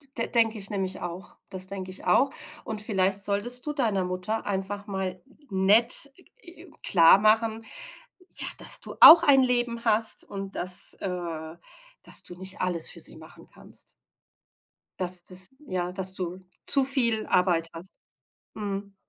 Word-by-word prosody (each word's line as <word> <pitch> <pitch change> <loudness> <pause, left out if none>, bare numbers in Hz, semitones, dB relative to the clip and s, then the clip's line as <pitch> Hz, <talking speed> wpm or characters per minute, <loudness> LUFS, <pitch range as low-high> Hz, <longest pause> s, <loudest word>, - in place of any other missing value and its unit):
d 230 - -2
denke 225 -2 +1
ich 195 - -4
nämlich 190 -2 -3
auch. 175 +1 -7
Das 185 -1 -4
denke 190 -1 -7
ich 185 - -8
auch. 275 - +4 0.3
Und 215 -1 -5
vielleicht 195 -2 0
solltest 235 +5 -2
du 300 - -3
deiner 220 -9 0
Mutter 185 +5 -3
einfach 200 +1 -3
mal 190 -2 -4 0.3
nett, 215 +8 +3 0.3
äh, 345 0 -14
klarmachen, 215 +6 +4 0.7
ja, - - -7
dass - - -2
du - - -9
auch 330 +1 +11
ein 280 -4 +6
Leben 240 -2 -1
hast 220 +1 +1
und 195 -1 -7
dass, 180 +1 -2
äh, 170 -3 -5 0.5
dass - - -4
du 175 - -9
nicht 190 +1 -7
alles 175 -3 0
für - - -9
sie - - -1
machen - - -15
kannst. - - -12 1.1
Dass 180 -1 0
dass, 185 +1 0 0.2
ja, 180 -3 -3
dass 190 0 -1
du 185 0 -6 0.2
zu 275 -2 +4
viel 235 -5 +1
Arbeit 175 -3 +1
hast. 170 +3 -10 0.6
Mhm. 200 -1 -5
195 Hz, 150 wpm, -26 LUFS, 185-225 Hz, 1.1 s, auch